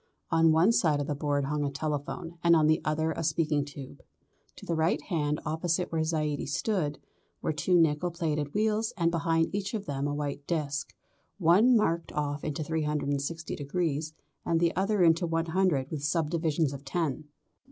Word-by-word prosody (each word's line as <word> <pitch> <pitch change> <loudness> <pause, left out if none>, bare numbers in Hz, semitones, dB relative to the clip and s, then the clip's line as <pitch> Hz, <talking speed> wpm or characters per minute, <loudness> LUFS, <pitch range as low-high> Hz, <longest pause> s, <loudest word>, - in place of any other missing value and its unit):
On 165 -1 +5
one 165 +7 +5
side 155 -10 +2
of 145 - -1
the 150 - -2
board 145 -1 0
hung 150 +1 -1
a 140 - 0
telephone 155 +4 -4
and 170 0 +6
on 155 -1 +4
the 155 +1 +3
other 155 +1 0
a 160 - -4
speaking 155 -2 +1
tube. 140 -2 -10 0.5
To - - -12
the 170 - -1
right 160 +1 +1
hand 150 -5 -1
opposite 165 +3 -1
where 165 -1 0
Zaidie 155 -3 -1
stood 150 -1 -1 0.4
were - - -1
two 175 +3 +2
nickel 160 +2 +2
plated 155 -4 -2
wheels 215 +1 +1
and 170 -2 +2
behind 165 0 +1
each 200 +2 -2
of 210 -2 -4
them 140 0 -2
a 145 - -2
white 145 -1 -4
disc, 145 -4 -2 0.4
one 205 +8 +5
marked 170 -5 0
off 145 -1 -2
into 155 0 -3
360 150 0 -2
degrees, 155 0 -2 0.3
and 165 - +1
the 170 0 +1
other 195 +1 +2
into 165 +1 +4
100 165 -3 0
with 150 -3 -4
subdivisions 160 -1 0
of 140 0 -8
tens. 155 0 -2
160 Hz, 175 wpm, -29 LUFS, 145-170 Hz, 0.5 s, and